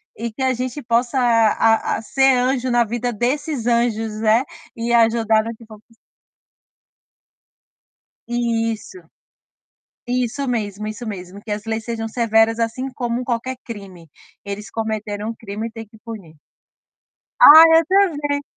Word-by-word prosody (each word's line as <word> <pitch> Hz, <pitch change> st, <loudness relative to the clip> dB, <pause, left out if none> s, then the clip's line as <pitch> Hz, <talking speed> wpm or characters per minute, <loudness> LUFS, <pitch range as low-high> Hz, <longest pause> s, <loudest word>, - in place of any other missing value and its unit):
e 230 Hz, +1 st, -5 dB
que 265 Hz, +4 st, -5 dB
a 260 Hz, 0 st, +2 dB
gente 255 Hz, +3 st, -5 dB
possa 240 Hz, +2 st, 0 dB
a 225 Hz, -2 st, +2 dB
a -, -, -6 dB
ser 270 Hz, +3 st, +3 dB
anjo 255 Hz, 0 st, 0 dB
na 240 Hz, -1 st, +3 dB
vida 240 Hz, +2 st, -3 dB
desses 255 Hz, +3 st, -2 dB
anjos, 225 Hz, -2 st, 0 dB
né, 225 Hz, +3 st, +3 dB, 0.3 s
e 235 Hz, +1 st, -2 dB
ajudar 225 Hz, -1 st, +3 dB
no 230 Hz, 0 st, -6 dB
que 230 Hz, -, -16 dB
for 215 Hz, -1 st, -14 dB
possí 230 Hz, -, -26 dB, 2.3 s
Isso, 235 Hz, -, -2 dB, 1.1 s
isso 250 Hz, +2 st, -2 dB
mesmo, 215 Hz, -3 st, -3 dB
isso 215 Hz, +3 st, -7 dB
mesmo, 195 Hz, -1 st, -8 dB
que 215 Hz, -, -7 dB
as 210 Hz, +1 st, -4 dB
leis 220 Hz, 0 st, -3 dB
sejam 225 Hz, -1 st, -4 dB
severas 225 Hz, -1 st, +2 dB
assim 235 Hz, +3 st, -2 dB
como 240 Hz, 0 st, -3 dB
qualquer 250 Hz, +2 st, -3 dB
crime. 190 Hz, -, -10 dB, 0.4 s
Eles 200 Hz, +1 st, -6 dB
cometeram 215 Hz, -1 st, -4 dB
um 230 Hz, -, -5 dB
crime 220 Hz, +1 st, -6 dB
e -, -, -11 dB
têm 225 Hz, -1 st, -9 dB
que 220 Hz, +1 st, -19 dB
punir. 195 Hz, -10 st, -10 dB, 1.0 s
Ai 315 Hz, +2 st, +10 dB
eu 330 Hz, -, +2 dB
também. 295 Hz, -7 st, +1 dB
230 Hz, 145 wpm, -20 LUFS, 220-245 Hz, 2.3 s, Ai